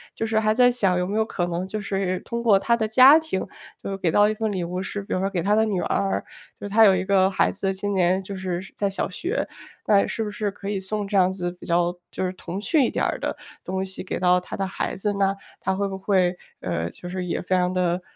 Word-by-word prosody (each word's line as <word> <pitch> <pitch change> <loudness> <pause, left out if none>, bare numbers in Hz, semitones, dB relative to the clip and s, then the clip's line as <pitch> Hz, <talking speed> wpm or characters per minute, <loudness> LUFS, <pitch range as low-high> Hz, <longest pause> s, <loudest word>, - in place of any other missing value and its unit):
就 225 - -2
是 220 -1 +1
还 215 0 +2
在 245 +1 +5
想， 195 -7 +1
有 180 - 0
没 200 +3 -3
有 220 - +3
可 185 -5 -2
能 175 +1 -3
就 215 +3 -4
是 195 -2 -2
通 235 0 -4
过 220 -4 +5
他 235 +4 +2
的 220 -2 -1
家 260 +7 +8
庭， 315 -12 -3 0.4
就 195 - -3
给 180 - +1
到 205 +5 +5
一 215 - 0
份 220 0 -2
礼 185 -3 -2
物 180 +2 -3
是 200 +1 -5
比 - - -5
如 - - 0
说 195 +1 0
给 180 -4 -2
他 205 - +2
的 220 +1 +4
女 205 -4 -1
儿， 195 -1 -1 0.3
就 - - -5
他 215 +3 +5
有 195 -3 +7
一 185 +1 -1
个 190 -1 +4
孩 195 - +2
子， 195 0 -1
今 205 +1 -2
年 185 0 +2
就 195 +1 -7
是 185 -2 -3 0.2
在 200 - 0
小 195 - -2
学， 350 - -2 0.4
那 200 -2 +4
是 225 - -2
不 210 - -4
是 210 0 -2
可 195 0 -9
以 200 -1 -1
送 205 +2 -3
这 200 - -4
样 185 -1 +4
子 180 -2 -3
比 175 - -13
较 175 0 +2 0.2
就 185 - -3
是 185 - -2
童 185 0 -6
趣 290 +7 +2
一 - - +2
点 - - -1
儿 - - -2
的 - - -3 0.3
东 190 +1 -2
西， 190 0 -4
给 185 - -4
到 180 0 +4
他 180 - -8
的 195 - -1
孩 190 - -3
子 205 +2 -1
呢？ 195 -1 +1 0.2
他 190 0 -1
会 200 +1 -1
不 195 - -5
会， 185 -2 +1 0.3
呃， 85 -2 -2
就 175 - -11
是 185 +1 -4
也 175 - -2
非 185 +1 0
常 180 0 +2
地 180 -1 0
195 Hz, 290 characters per minute, -24 LUFS, 185-210 Hz, 0.4 s, 家